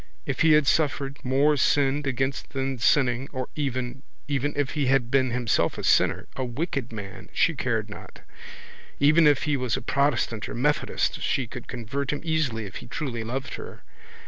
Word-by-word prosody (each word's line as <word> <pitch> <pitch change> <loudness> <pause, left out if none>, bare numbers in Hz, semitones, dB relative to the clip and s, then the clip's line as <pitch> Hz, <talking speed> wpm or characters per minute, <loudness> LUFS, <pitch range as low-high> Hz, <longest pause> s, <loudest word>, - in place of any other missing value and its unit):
If 140 -2 -3
he 165 -1 +6
had 150 -1 +5
suffered, 140 -1 +1
more 140 +4 +3
sinned 140 +1 +2
against 135 +1 -2
than 135 -1 -2
sinning, 125 +4 +2
or 130 -2 -4
even, 130 -3 -3 0.3
even, 145 0 0
if 145 -2 0
he 145 -4 0
had 125 -2 +2
been 130 -2 +3
himself 120 -1 0
a - - -5
sinner, - - +3
a 130 - -2
wicked 130 0 -3
man, 100 -3 -8
she - - +3
cared - - -1
not. - - -11 0.8
Even 155 +3 +6
if 145 -2 +3
he 150 -1 +1
was 125 -4 -1
a - - -5
protestant 125 -5 0
or - - -5
methodist 145 +5 0
she 135 - 0
could 125 +1 -9
convert 125 +4 -3
him 150 - -3
easily 150 -9 0
if 95 - -7
he - - -10
truly 120 -3 -4
loved 130 +3 -4
her. - - -10
135 Hz, 180 wpm, -26 LUFS, 125-145 Hz, 0.8 s, he